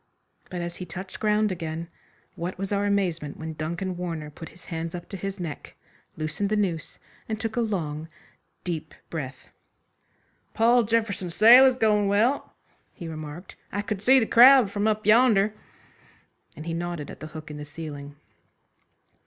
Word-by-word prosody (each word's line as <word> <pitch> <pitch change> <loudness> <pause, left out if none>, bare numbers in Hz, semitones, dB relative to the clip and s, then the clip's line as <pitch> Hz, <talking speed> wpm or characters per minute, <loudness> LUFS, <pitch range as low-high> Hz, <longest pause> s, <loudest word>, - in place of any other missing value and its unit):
But 180 -1 -4
as 170 0 -5
he 180 - -6
touched 185 +3 -8
ground 210 -1 +2
again 165 -1 -4 0.5
what 175 +2 -5
was 195 +1 -4
our 205 0 +1
amazement 175 -7 -1
when 160 0 -5
Duncan 170 +4 -3
Warner 165 -4 -4
put 165 +2 -10
his 175 - -18
hands 165 0 -4
up 175 - -7
to - - -6
his 195 +1 -5
neck, 165 -5 -6 0.4
loosened 155 +6 -2
the 215 - +1
noose, 180 -7 -2 0.3
and 220 0 -2
took 225 -1 -3
a 240 - +1
long, 160 -8 -2 0.6
deep 160 -3 -4 0.2
breath. 135 -5 -6 1.1
"Paul 235 +2 +5
Jefferson's 205 -6 -1
sale 245 +5 +9
is 255 -1 +2
goin' 210 -3 +3
well," 220 +8 +1 0.4
he 170 - -7
remarked, 155 +2 -8 0.2
"I 205 +1 -2
could 205 -2 -3
see 260 +5 +6
the 225 - +1
crowd 245 -2 +7
from 205 +1 0
up 215 -1 0
yonder," 215 -2 +5 1.0
and 155 - -9
he 165 - -3
nodded 170 -3 -4
at - - -11
the 155 - -7
hook 155 -1 -9
in 150 - -7
the 150 - -6
ceiling. 145 -2 -8
185 Hz, 170 wpm, -26 LUFS, 160-210 Hz, 1.1 s, sale